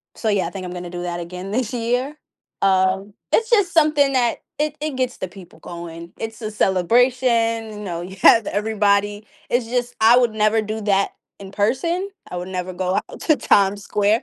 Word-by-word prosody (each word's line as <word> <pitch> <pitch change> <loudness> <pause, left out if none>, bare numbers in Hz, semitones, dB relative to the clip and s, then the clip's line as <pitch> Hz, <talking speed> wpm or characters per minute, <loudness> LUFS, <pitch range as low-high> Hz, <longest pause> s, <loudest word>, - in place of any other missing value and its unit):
So 220 - -2
yeah, 195 -4 +1
I - - -4
think 185 +1 -7
I'm 180 - -6
gonna 180 -1 -6
do 175 0 -5
that 175 0 -3
again 180 +3 -7
this 235 +2 -1
year, 245 +4 -1 0.5
um, 190 +1 +2 0.2
it's 455 +1 +2
just 410 -6 +3
something 300 -4 +4
that 240 -2 +2 0.2
it 300 0 -1
it 300 -3 -3
gets 255 -1 -2
the 185 - -4
people 180 -2 -14
going, 170 0 -9
it's 225 0 -6
a 215 - -3
celebration, 230 +3 +2
you 210 - -8
know, 175 -5 -4
you 185 +2 -8
have 225 -3 +7
everybody, 205 0 0 0.2
it's 240 -1 +1
just, 245 +1 -2
I 225 +2 +7
would 245 -3 +3
never 215 +1 +2
do 215 +1 -4
that 200 -1 +1 0.3
in 195 -1 -10
person. 270 - 0 0.2
I - - -5
would 180 +1 -5
never 185 0 -4
go 185 +1 -1
out - - -11
to 310 - +3
Time 200 -5 +3
Square. 205 +2 +1
210 Hz, 200 wpm, -21 LUFS, 190-245 Hz, 0.5 s, have